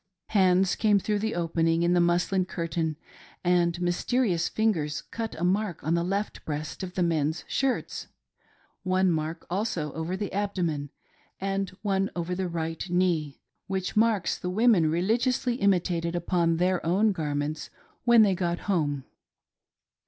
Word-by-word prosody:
Hands 190 -2 +4
came 210 -2 +4
through 210 +1 0
the 220 +1 -2
opening 165 -1 +1
in 175 +1 +3
the 175 - +4
muslin 175 +2 +2
curtain, 165 -3 -2 0.5
and 175 -1 +2
mysterious 180 +1 +1
fingers 165 -9 0
cut 225 -1 -5
a - - -3
mark 190 0 0
on 160 - 0
the 170 0 +1
left 200 +4 -2
breast 150 -2 -5
of 185 -1 -6
the 180 - +1
men's 160 -1 0
shirts 270 -2 -1 0.4
— - - -36
one 185 0 +2
mark 160 +1 -3
also 180 -6 -2
over 165 +3 -3
t^e 205 0 -4
abdomen, 175 -8 -1 0.5
and 195 0 -1
one 195 -1 +1
over 175 0 -2
the 185 0 -2
right 165 +1 -4
knee 170 -5 0
— - - -49
^which 190 -1 -2
marks 215 -5 +2
the 180 - -3
women 200 -5 +4
religiously 235 - +1
imi 200 -2 +4
tated 170 -1 -2
upon 170 -1 +1
their 180 +1 +1
own 195 +6 +3
garments 150 -3 -3 0.3
when 235 -2 +7
they 200 -2 +3
got 175 -1 -1
home. 150 -8 0
180 Hz, 155 wpm, -27 LUFS, 165-195 Hz, 0.5 s, when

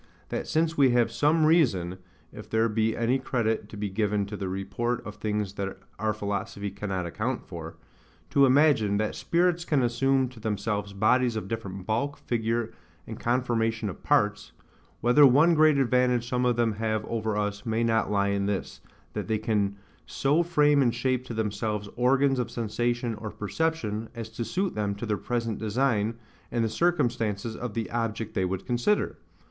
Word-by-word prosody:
That - - -3
since 160 +1 +1
we 140 -3 +5
have 120 - +3
some 155 +2 +3
reason 95 - +2 0.3
(if - - -10
there 110 +1 +2
be 110 0 0
any 120 +3 +1
credit 115 -5 -1
to 105 - -9
be 105 0 -2
given 105 0 0
to 100 +1 -6
the 95 -2 -4
report 120 +6 -2
of 105 0 -8
things 105 -2 -2
that 100 -1 -4 0.2
our 110 +1 +1
philosophy 100 0 -3
cannot 95 -3 -3
account 110 +9 -3
for) 85 -2 -8 0.6
to 140 -1 +5
imagine, 130 -7 +4
that 110 0 -1
Spirits 175 0 +1
can 150 -6 +1
assume 130 +2 +2
to 125 -2 -14
themselves 105 -1 -2
bodies 120 +4 +2
of 110 - -4
different 100 -5 -5
bulk, 130 +7 -1
figure, 115 -1 -1 0.3
and - - -8
conformation 115 -3 0
of - - -13
parts—whether 105 +5 +1
one 150 +7 +5
great 155 -2 +5
advantage 125 -2 +2
some 125 0 0
of 120 - +2
them 115 -1 +2
have 110 0 -2
over 110 -2 -2
us 105 0 -2
may 115 0 0
not 115 -1 +1
lie 100 -1 +1
in 100 0 0
this, 100 -2 -3 0.3
that - - -4
they 110 - +1
can 105 -2 0 0.3
so 145 +5 +2
frame 150 -4 +3
and 120 -3 +2
shape 130 -1 0
to 125 - -6
themselves 105 -1 -2
organs 135 +2 +3
of 120 -2 -1
sensation 120 +1 -1
or 110 0 -6
perception, 110 -2 -2
as 115 -1 -6
to 115 +1 -4
suit 180 - -1
them 100 -1 -1
to 100 - -5
their 105 -2 0
present 115 0 -2
design, 110 0 0 0.4
and 115 -1 +1
the - - 0
circumstances 115 - 0
of 120 -4 -5
the 115 -2 -2
object 115 -2 -2
they 95 -4 +1
would 95 +1 -3
consider. 125 +13 0
115 Hz, 175 wpm, -27 LUFS, 105-125 Hz, 0.6 s, we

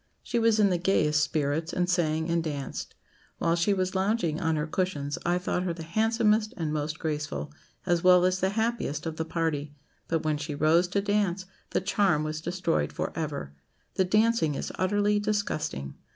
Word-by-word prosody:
She 240 - -1
was 225 -1 +3
in 200 -2 +4
the 175 - +1
gayest 155 -5 +2
spirits, 155 +2 -1
and 180 -1 0
sang 160 -3 +1
and 170 -1 +1
danced. 145 -4 -5 0.4
While 165 0 +1
she 170 +4 +2
was 185 -1 0
lounging 190 -5 0
on 160 -1 +1
her 150 0 -1
cushions, 155 -4 -2
I 175 +1 +3
thought 180 0 -1
her 180 -2 -2
the 165 - -7
handsomest 220 +4 +1
and 160 -3 -2
most 150 0 -2
graceful, 150 -1 -3 0.3
as 175 -2 +1
well 180 0 +6
as 185 0 +1
the 190 - +2
happiest, 220 -8 -1
of 160 -1 -4
the 160 - -2
party; 155 -3 -2 0.3
but 165 -1 0
when 155 -1 0
she 150 0 -4
rose 160 +4 +3
to 200 +3 0
dance, 200 -2 0 0.2
the - - 0
charm 190 -6 +2
was 155 0 -3
destroyed 175 0 -1
for - - -3
ever. 145 - -4 0.4
The 190 - +2
dancing 210 -5 +2
is - - -4
utterly 205 +2 +1
disgusting. 200 - -2
170 Hz, 185 wpm, -28 LUFS, 155-195 Hz, 0.4 s, well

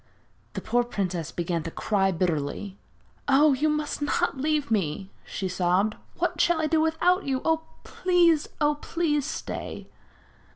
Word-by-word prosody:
The - - -4
poor 245 0 +1
princess 180 -8 -3
began 170 -1 -2
to 165 - -5
cry 195 +2 +1
bitterly. 175 +3 -2 0.5
'Oh! 285 +1 +5
you 295 +4 +1
must 300 -1 -2
not 290 - 0
leave 300 -2 0
me!' 190 -1 -1
she 190 - -4
sobbed. 185 +3 +1 0.2
'What - - 0
shall 345 -1 +3
I 315 - +1
do 315 0 +2
without 345 +4 +2
you? 265 -1 0 0.4
Please, 345 -4 +2
oh! 295 -1 +3
please 300 -4 0
stay.' - - -5
265 Hz, 140 wpm, -26 LUFS, 185-310 Hz, 0.5 s, Oh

